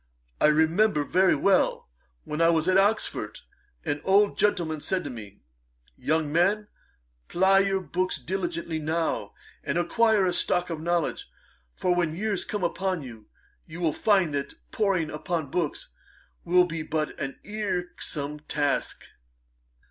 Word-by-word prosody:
I - - +6
remember 160 +3 +3
very 185 +5 +3
well, 195 -1 +2 0.4
when 150 +2 -3
I 165 - +5
was 165 0 +2
at 185 - +3
Oxford, 205 +3 +1 0.4
an 145 -2 -2
old 200 +2 +4
gentleman 170 -7 0
said 185 +3 -1
to 145 - -5
me, 105 -4 -10 0.5
"Young 155 - -1
man, 205 +5 +2 0.6
ply 190 +2 +4
your 195 -1 +1
book 185 +2 -2
diligently 170 -3 -2
now, 160 +2 -2 0.3
and - - -1
acquire 210 +4 +3
a 180 - +1
stock 180 0 +1
of 160 -2 -4
knowledge; 170 -1 -1 0.5
for 180 - +1
when 170 -3 0
years 205 +1 -1
come 210 -3 -3
upon 185 -1 -1
you, 115 -4 -11 0.4
you 165 +1 -9
will 165 -4 +1
find 190 -7 +2
that 140 -1 -3 0.2
poring 190 -7 0
upon 155 -2 -3
books 170 -5 -2 0.6
will 180 +1 +5
be 165 -2 -4
but 155 -1 -2
an 135 -3 -5
irksome 180 -8 -3
task."' 145 -1 -1
175 Hz, 140 wpm, -26 LUFS, 155-190 Hz, 0.6 s, I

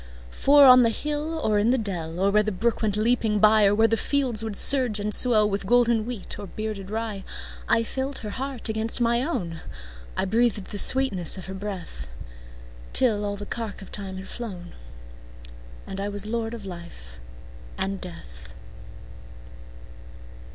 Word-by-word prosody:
For 285 - +5
on 255 -1 +8
the 230 - +3
hill 300 +6 -4
or 210 -1 +1
in 210 +3 +1
the 260 - +2
dell, 175 -7 -5
Or 195 +1 +1
where 210 +1 +3
the 215 0 -3
brook 225 +5 -2
went 210 -2 -1
leaping 220 -1 0
byOr 210 -1 +4
where 225 +1 +4
the 225 - +1
fields 250 -3 0
would 220 -3 -5
surge 250 -6 +7
and 210 +1 -3
swellWith 210 -5 +4
golden 235 -1 +2
wheat 240 -6 -4
or 205 - -8
bearded 210 -2 -6
rye,I 195 - -4
felt 265 +4 -4
her 210 - -5
heart 265 +1 -5
against 220 +1 -2
my 235 0 +1
own,I - - -6
breathed 220 -1 -1
the 205 - 0
sweetness 200 -12 +4
of 185 - -8
her 190 - -8
breath, 190 - -7 0.9
Till 220 -5 +1
all 205 0 -3
the 205 - -8
cark 220 -3 -6
of - - -15
time 195 -2 -6
had 190 0 -9
flown, 190 -8 -8 1.1
And 195 0 -7
I 200 - -3
was 205 0 -2
lord 225 +1 -4
of 215 -4 -10
life 170 - -11 0.6
and 195 0 -4
death. - - -11
210 Hz, 160 wpm, -24 LUFS, 190-235 Hz, 1.1 s, on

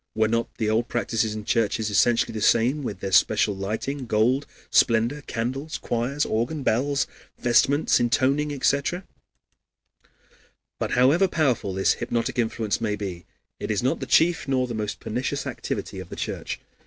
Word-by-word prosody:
Were 110 0 +3
not 115 +1 0
the 110 - -1
old 110 +2 +1
practices 115 -2 -1
in 105 -1 -6
churches 110 -1 0
essentially 115 +5 +3
the 110 - -4
same, 120 +8 +3
with 115 -7 -5
their 95 - -3
special 105 +1 +3
lighting, 110 +7 -4
gold, 120 +6 +2 0.2
splendor, 115 +5 +3
candles, 130 +7 -3
choirs, 125 +5 -1
organ, 120 +7 -1
bells, 140 +5 +1 0.3
vestments, 135 +5 +3
intoning, 135 +5 +1
etc.? 140 +6 0 1.8
But - - -2
however 145 +10 +4
powerful 130 - 0
this 95 - +3
hypnotic 120 +2 -2
influence 110 -2 -1
may 105 -2 0
be, 95 -4 -6 0.3
it - - -5
is - - 0
not - - +1
the - - -5
chief 165 -1 +3
nor 130 -2 +1
the 120 - -5
most 105 -2 -3
pernicious 125 +4 -3
activity - - -4
of - - -9
the - - -7
Church. - - -4
120 Hz, 155 wpm, -25 LUFS, 110-135 Hz, 1.8 s, however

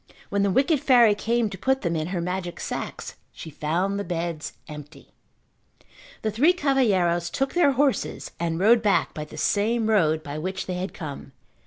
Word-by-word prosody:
When 200 - 0
the 200 - +2
wicked 275 - +2
fairy 245 -6 +5
came 230 +2 0
to 195 - -8
put 265 0 +1
them 170 -2 -1
in 155 0 -2
her 180 -1 -3
magic 180 0 -4
sacks - - -5
she 160 - -10
found 175 +7 -1
the - - -2
beds 170 -4 -4
empty. 150 0 -11 1.1
The 215 - 0
three 285 - +4
cavalheiros 200 - +1
took 270 +7 -2
their 340 -6 +4
horses 275 0 0
and 165 -1 -1
rode 225 +4 +5
back 210 -2 +1
by 150 - -5
the 155 - -12
same 220 +6 +1
road 160 -6 +2
by 145 +1 -6
which 185 +4 -4
they 185 - -4
had 180 +2 -4
come. 145 -4 -8
190 Hz, 180 wpm, -24 LUFS, 170-235 Hz, 1.1 s, fairy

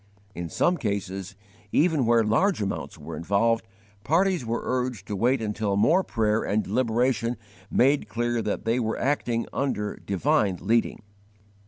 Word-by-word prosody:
In 85 -2 -5
some 175 - +1
cases, 100 - -3 0.4
even 155 -6 +2
where 115 -1 +4
large 175 - +2
amounts 100 -2 -4
were - - -8
involved, 110 +6 +1 0.4
parties 175 - +2
were 115 0 -2
urged 125 -5 -2
to 105 - -4
wait 120 +4 +1
until 105 -2 -1
more 160 - +4
prayer 110 -5 0
and 105 +1 0
deliberation 120 +1 0 0.3
made 140 +3 +2
clear 120 0 -1
that 105 - -3
they 115 +2 +1
were 110 -2 -1
acting 125 -4 0
under 105 -7 -2
divine 100 - +1
leading. 115 -1 0
115 Hz, 145 wpm, -26 LUFS, 105-130 Hz, 0.4 s, where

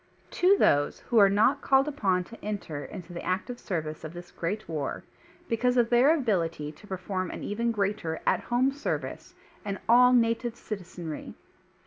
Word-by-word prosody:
To 380 +3 +4
those 145 - +2
who 235 - +2
are 200 -1 +7
not 220 +8 +3
called 270 +1 +3
upon 195 -11 +1
to 230 +6 -14
enter 195 -8 -4
into 175 -1 -9
the 170 - -5
active 185 +7 -3
service 155 -5 -4
of 155 +1 -7
this 175 0 -10
great 200 +6 -4
WAR, 155 -4 -3 0.4
because 250 +2 +1
of 240 -1 +3
their 245 +5 +6
ability 170 - -1
to 155 +7 -17
perform 185 -1 -3
an - - -7
even 230 +3 -1
greatr 200 -6 -1
at - - +3
home 250 +3 +2
service, 285 +1 -4 0.3
and 200 -2 -3
all 250 +2 +7
native 235 -1 +2
citizenry. 180 -8 -7
205 Hz, 165 wpm, -28 LUFS, 175-240 Hz, 0.4 s, are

